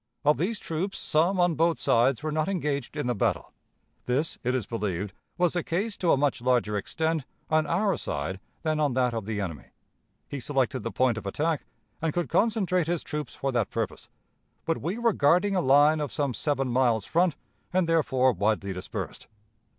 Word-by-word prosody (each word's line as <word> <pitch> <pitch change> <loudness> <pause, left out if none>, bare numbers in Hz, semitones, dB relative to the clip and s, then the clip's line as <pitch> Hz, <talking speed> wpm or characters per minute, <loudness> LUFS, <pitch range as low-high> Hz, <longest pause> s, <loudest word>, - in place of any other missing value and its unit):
Of 150 +1 +4
these 205 +7 0
troops, 180 +4 -3
some 175 +5 +1
on 175 -1 +4
both 165 +1 +2
sides 125 +4 +2
were 155 - -1
not 155 0 0
engaged 150 -7 -2
in 145 - -1
the 125 - +1
battle. 105 - -1 0.5
This, 135 +6 0
it 125 +1 +1
is 125 -6 -1
believed, 100 -4 -3 0.2
was 175 -2 +2
the 175 - 0
case 200 +7 -2
to 175 - +2
a - - +4
much 140 -3 +1
larger 120 -4 +2
extent 160 +9 -1 0.3
on 155 -1 +3
our 195 +5 +2
side 80 +7 -3 0.2
than 155 -1 0
on 145 -4 +2
that 125 -1 +1
of 110 -3 -3
the 105 -1 -3
enemy. 85 -9 -4 0.6
He 140 - -5
selected 135 0 0
the - - -3
point 125 -3 +1
of 100 - -8
attack, 155 +8 -1 0.4
and 160 -2 0
could 175 -1 -1
concentrate 195 -6 +2
his 170 -1 -1
troops 150 -4 -5
for 135 - -2
that 120 -5 0
purpose, - - -4 0.6
but 165 - -1
we 180 +7 -2
were 235 -2 +2
guarding 180 +8 +3
a 185 - +2
line 145 +3 +5
of 145 -3 -2
some 140 -3 -1
seven 135 0 0
miles 120 -4 +2
front, 170 -1 +2 0.4
and 180 -2 +2
therefore 130 -6 +3
widely 100 0 0
dispersed. 90 0 -6
145 Hz, 190 wpm, -27 LUFS, 120-165 Hz, 0.6 s, line